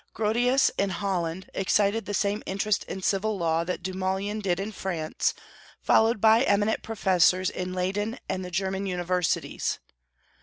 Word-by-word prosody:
Grotius, 240 +5 +2
in 200 - +2
Holland, 185 -2 -3
excited 200 +2 +1
the 205 - -2
same 205 +2 0
interest 200 +2 0
in 190 - -6
civil 205 +2 0
law 165 -2 +1
that 180 0 -4
Dumoulin 190 +3 -2
did 185 -3 -1
in 200 +3 -3
France, 175 -6 -2 0.4
followed 225 0 +3
by 220 +2 +5
eminent 205 -3 +2
professors 185 -4 +2
in 185 0 -4
Leyden 200 +5 -2
and 190 0 -3
the 180 - -6
German 190 +2 -2
universities. 180 -2 -1
195 Hz, 145 wpm, -26 LUFS, 185-210 Hz, 0.4 s, by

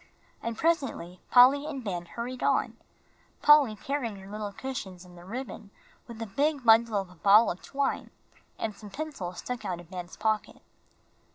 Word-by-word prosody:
And 230 -1 -4
presently 270 - -1
Polly 270 +4 +6
and 275 -4 -5
Ben 175 -5 -4
hurried 245 +5 -6
out, - - +2 0.7
Polly 295 -7 +7
carrying 245 -1 -3
her 195 0 -11
little 210 -1 -4
cushions 195 -7 -6
and 180 -1 -15
the 175 - -13
ribbon, 225 0 -7 0.4
while 235 -2 -10
a - - -4
big 280 +6 0
bundle 225 -1 +5
of 190 -2 -6
a - - -16
ball 205 +6 +6
of 180 - -8
twine 275 0 -2 0.5
and 215 -2 -3
some 210 0 -11
pencils 235 - -6
stuck 250 -1 -5
out 175 -2 -3
of 175 +1 -14
Ben's 180 -1 -7
pocket. 215 0 -1
220 Hz, 170 wpm, -28 LUFS, 190-265 Hz, 0.7 s, Polly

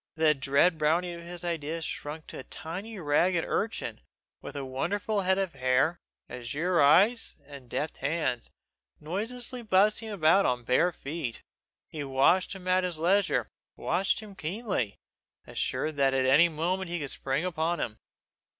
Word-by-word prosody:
The 160 -1 +4
dread 140 +5 +2
brownie 170 +4 +2
of 170 - -8
his 175 +1 -7
idea 165 -1 -3
shrunk 155 +1 -5
to - - -8
a - - -7
tiny 195 +12 -7
ragged 170 +2 +2
urchin, 220 +2 -2 0.4
with - - -8
a 140 -1 -4
wonderful 200 +11 -1
head 190 0 +2
of 195 -3 -1
hair, 135 +5 +2 0.3
azure 145 +9 -1
eyes, 200 +12 +4
and 140 -4 -12
deft 150 +5 -3
hands, 135 -4 -1 0.5
noiselessly 230 +9 -4
bustling 215 +1 +3
about 195 -1 +4
on 125 -1 0
bare 130 +9 +3
feet. 145 -6 -5 0.4
He 150 -2 -6
watched 140 +9 +3
him 185 -2 -9
at 185 0 +3
his 180 -3 -2
leisure, 190 +5 +2 0.3
watched 195 +3 0
him 210 -2 -10
keenly, 185 - -2 0.5
assured 155 -1 -2
that 135 -1 +3
any 135 +6 +5
moment 175 +4 -1
he 175 - -2
could 145 -5 -2
spring 135 +5 -1
upon 170 -1 -1
him. 110 -3 -4
165 Hz, 150 wpm, -29 LUFS, 140-185 Hz, 0.5 s, any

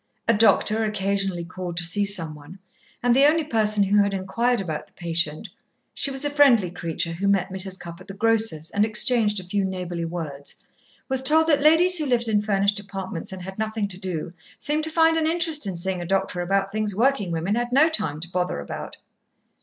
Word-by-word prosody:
A 230 - +4
doctor 220 0 +3
occasionally 195 -4 -1
called 180 -1 -7
to 175 - 0
see 200 +5 0
someone, 165 -4 0 0.5
and 245 -1 +3
the 275 +2 +6
only 320 +2 +2
person 215 -6 +1
who 205 +1 +3
had 200 -1 0
inquired 230 +6 0
about 160 -6 -5
the - - -26
patient 165 -3 -2 0.5
(she - - 0
was 270 +1 -2
a - - +1
friendly 250 -11 +4
creature, 170 -1 -3
who 185 +4 -3
met 195 -1 +1
Mrs. 190 0 -1
Cupp 170 +1 -9
at 185 - -14
the 195 - -8
grocer's, 220 -7 +1
and 205 - +1
exchanged 215 -1 +1
a - - -8
few 195 +3 -1
neighbourly 180 -3 -4
words) 155 -5 -6 0.5
was 265 -1 -1
told 315 +4 +4
that 290 -3 +3
ladies 335 +4 +6
who 305 - -1
lived 240 -2 +1
in 210 -2 +2
furnished 200 0 +1
apartments, 195 -4 -6
and 190 -1 -8
had 190 +2 -9
nothing 220 -1 -2
to 185 -1 -7
do, 180 -4 -4 0.3
seemed 305 +1 -1
to - - -3
find 325 0 +3
an 315 -1 +1
interest 325 - 0
in 185 -3 -4
seeing 185 +1 -2
a - - -5
doctor 190 -1 -1
about 195 +2 0
things 215 -1 -2
working 230 -5 +1
women 170 +4 -1
had 240 +2 -2
no 285 +5 +5
time 160 - -1
to 175 +1 -6
bother 180 - -2
about. 70 - -7
200 Hz, 210 wpm, -23 LUFS, 180-235 Hz, 0.5 s, the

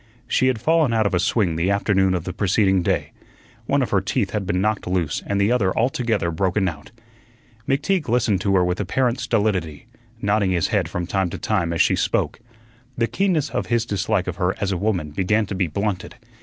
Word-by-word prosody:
She 130 - +2
had 130 -4 +1
fallen 155 0 +2
out 110 -1 +2
of 100 - 0
a 90 - +2
swing 90 -3 +1
the 85 +3 +1
afternoon 95 -2 +2
of 85 - -3
the 90 - -5
preceding 95 -1 +2
day; - - -1 0.6
one 140 -1 +2
of - - -4
her 100 - +3
teeth 100 0 -1
had 105 -3 -3
been 90 +1 0
knocked 105 0 -1
loose 90 -5 -1
and 100 0 0
the 100 +3 +2
other 100 -7 +1
altogether 115 -7 0
broken 95 +3 0
out. 75 -4 -6 0.8
McTeague 150 - 0
listened 110 -5 +2
to 100 -1 +1
her 90 -1 +4
with 90 0 -1
apparent 120 +5 0
stolidity, 100 -9 -1 0.3
nodding 100 -2 +1
his 85 -4 +1
head - - 0
from 90 - -3
time 95 0 0
to - - -6
time 85 -1 -1
as 85 - +3
she - - +2
spoke. - - -1 0.6
The 115 - +2
keenness 165 -1 0
of - - -2
his 120 -1 +1
dislike 105 -2 -1
of 90 - -5
her 90 0 0
as 100 -1 -1
a - - 0
woman 90 -6 -1
began 105 +7 +1
to 100 - -6
be 95 -2 0
blunted. 100 +3 -3
100 Hz, 210 wpm, -22 LUFS, 90-115 Hz, 0.8 s, her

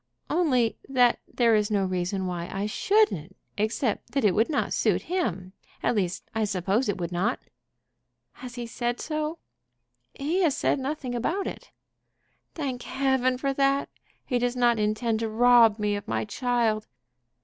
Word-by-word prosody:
"Only 260 -9 +2
that 250 -3 +4
there 235 -2 +3
is 210 -1 +2
no 200 -2 +1
reason 185 +1 -2
why 175 -1 -4
I 195 +1 -2
shouldn't, 415 - +1 0.2
except 220 +1 -1
that 275 - +1
it 200 - +4
would 225 - +2
not 295 - 0
suit - - +1
him. 190 - -2 0.3
At - - +2
least 185 -3 -2
I 220 - 0
suppose 200 +4 0
it 205 - -1
would 175 -1 -4
not." 195 +8 0 0.9
"Has 250 -1 -10
he 240 -1 -4
said 240 +1 -3
so?" 310 +1 -3 0.8
"He 315 +7 0
has 320 -6 +2
said - - +1
nothing 265 -2 -3
about 325 - -1
it." - - -7 0.9
"Thank 265 -6 -3
Heaven 265 -1 +1
for 275 +1 -1
that! 275 0 +1 0.4
He 250 -3 0
does 245 +1 0
not 240 -2 +3
intend 215 +2 0
to 225 -1 -2
rob 230 -1 +5
me 210 -1 0
of 205 - -6
my - - -1
child." 225 -1 0
240 Hz, 160 wpm, -26 LUFS, 210-270 Hz, 0.9 s, rob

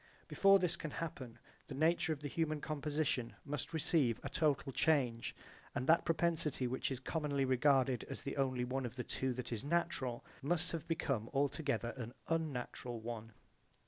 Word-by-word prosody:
Before 195 0 +6
this 180 -3 +1
can 165 -2 -5
happen 130 -7 -5 0.3
the 135 - -6
nature 165 +3 +3
of 150 -2 -2
the 145 - -3
human 155 +1 0
composition 145 -5 -1
must 145 0 -3
receive 145 -7 +2
a - - -3
total 150 -3 +1
change 130 -6 +2 0.4
and 125 - -1
that 165 +3 +5
propensity 165 -5 +1
which 125 +1 -1
is 130 -2 -3
commonly 140 0 0
regarded 130 -1 +3
as - - -5
the 140 - -4
only 130 -2 +1
one 130 0 -1
of 120 - -10
the 125 - -3
two 130 +1 -1
that 125 0 -5
is 115 0 -2
natural 140 -6 0 0.2
must 175 +4 +1
have 165 -1 -4
become 135 -9 -1
altogether 140 -3 0
an 120 -1 -6
unnatural 130 -6 -2
one. 115 -1 -6
140 Hz, 170 wpm, -36 LUFS, 125-160 Hz, 0.4 s, Before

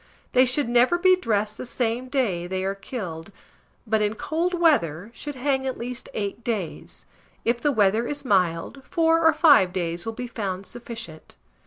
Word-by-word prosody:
They 255 +1 +5
should 255 +1 +1
never 245 +7 +4
be 370 +1 +5
dressed 215 - -1
the - - -4
same 245 +1 -1
day 205 -11 0
they 185 +1 -2
are 195 +1 -1
killed; 195 -4 -7 0.5
but, 220 -1 +1
in 210 +1 0
cold 335 +8 -1
weather, 205 - +2
should 290 +2 -7
hang 265 0 0
at 260 - -3
least 245 +1 -6
8 205 +2 -3
days; 215 -7 -4 0.4
if 235 +1 +1
the 295 - +2
weather 220 0 +2
is 290 -1 -5
mild, 185 +3 +1
4 330 +1 +2
or 320 - +7
5 285 - +5
days 170 -2 -3
will 225 - -4
be 245 - -5
found 200 -5 -4
sufficient. 230 -9 -8
230 Hz, 175 wpm, -24 LUFS, 195-265 Hz, 0.5 s, or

